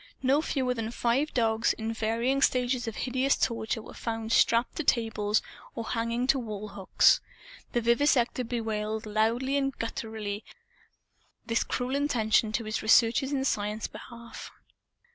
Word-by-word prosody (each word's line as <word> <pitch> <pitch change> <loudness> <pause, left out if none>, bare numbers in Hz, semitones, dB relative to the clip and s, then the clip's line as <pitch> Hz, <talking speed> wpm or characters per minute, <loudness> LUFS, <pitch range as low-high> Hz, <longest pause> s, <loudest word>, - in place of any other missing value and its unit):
No 275 +3 +3
fewer 260 -5 -1
than 225 -2 -4
five 240 +5 0
dogs, 225 -2 +2
in 225 0 -4
varying 230 +5 0
stages 250 -2 +1
of 225 - -4
hideous 260 +2 +1
torture, 225 -1 -1
were - - -11
found 225 -1 -4
strapped 230 +1 +3
to 320 - -1
tables 220 -5 +1 0.3
or 230 - -3
hanging 230 +1 -1
to 270 +1 +3
wall 215 -3 -6
hooks. 195 -1 +3 0.5
The 240 - +1
vivisector 250 +2 +2
bewailed, 220 -2 -3
loudly 230 +6 +1
and 275 -2 -1
gutturally, 220 -2 -4 1.0
this 230 0 +1
cruel 250 +2 -2
interruption 225 -6 +2
to 230 - -1
his 215 0 -3
researches 230 +4 +4
in 270 -2 0
Science's 210 -2 -1
behalf. 235 -1 -10
230 Hz, 145 wpm, -28 LUFS, 220-255 Hz, 1.0 s, researches